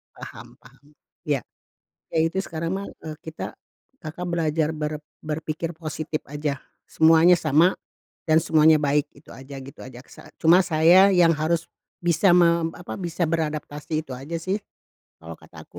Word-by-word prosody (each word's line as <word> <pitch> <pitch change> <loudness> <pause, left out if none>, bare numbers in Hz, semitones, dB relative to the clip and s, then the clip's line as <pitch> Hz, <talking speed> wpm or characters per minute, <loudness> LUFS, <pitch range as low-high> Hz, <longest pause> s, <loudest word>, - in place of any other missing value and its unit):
Paham - - -11
paham, 135 +5 -21 0.3
ya. - - 0 0.7
Ya - - -1
itu 190 +4 -2
sekarang 165 -1 -5
mah, 195 +1 -4 0.2
eee, 155 -1 -6
kita 160 0 -7 0.5
Kakak 160 +3 -6
belajar 160 -2 0
ber 150 0 -3 0.2
berpikir 155 +1 -4
positif 155 -1 -4
aja, 145 -1 -3 0.3
semuanya 165 +2 +5
sama 160 +4 +3 0.5
dan 160 0 +4
semuanya 155 0 +5
baik 145 0 +1
itu 145 - -18
aja, 135 +1 -11
gitu 135 0 -13
aja 125 -1 -11
saat - - -15
cuma 165 +3 +6
saya 180 +4 +5
yang 175 -2 +5
harus 160 +1 -1 0.3
bisa 175 +2 +3
mem 170 -2 +3
apa, 180 - -8
bisa 175 -1 -4
beradaptasi, 155 -1 -3
itu 150 - -19
aja 135 +6 -7
sih 190 +3 -1 0.6
kalau - - -9
kata - - -14
aku - - -14
160 Hz, 150 wpm, -24 LUFS, 150-170 Hz, 0.7 s, cuma